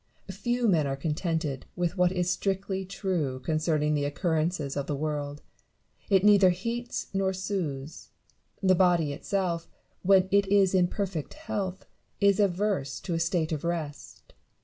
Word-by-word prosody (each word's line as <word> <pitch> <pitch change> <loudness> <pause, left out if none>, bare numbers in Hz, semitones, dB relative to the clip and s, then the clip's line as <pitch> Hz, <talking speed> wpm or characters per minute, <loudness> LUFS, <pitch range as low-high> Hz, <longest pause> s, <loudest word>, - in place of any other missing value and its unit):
Few 240 +5 0
men 160 -8 +3
are 135 - -1
contented 155 -2 -2
with 175 0 -1
what 180 -1 +3
is 180 -2 -1
strictly 190 0 -1
true 180 -9 -2
con 155 +4 0
cerning 155 -1 +1
the 145 -1 0
occurrences 155 -1 -1
of 140 -1 -2
the 145 - -1
world: 145 0 -3 0.7
it 195 -2 +4
neither 200 -2 +7
heats 230 +7 -3
nor 195 0 +1
soothes. 165 -7 -4 0.5
The 185 -1 +5
body 175 -5 +3
itself, 175 +1 -2 0.3
when 190 0 +5
it 200 0 +4
is 195 -1 +4
in 180 -2 +4
perfect 185 -6 -4
health, 200 - -4 0.3
is 200 -1 +4
averse 195 -7 0
to 175 - -3
a 165 - 0
state 165 -1 0
of 155 -3 -2
rest. 165 -4 -5
180 Hz, 150 wpm, -28 LUFS, 155-195 Hz, 0.7 s, neither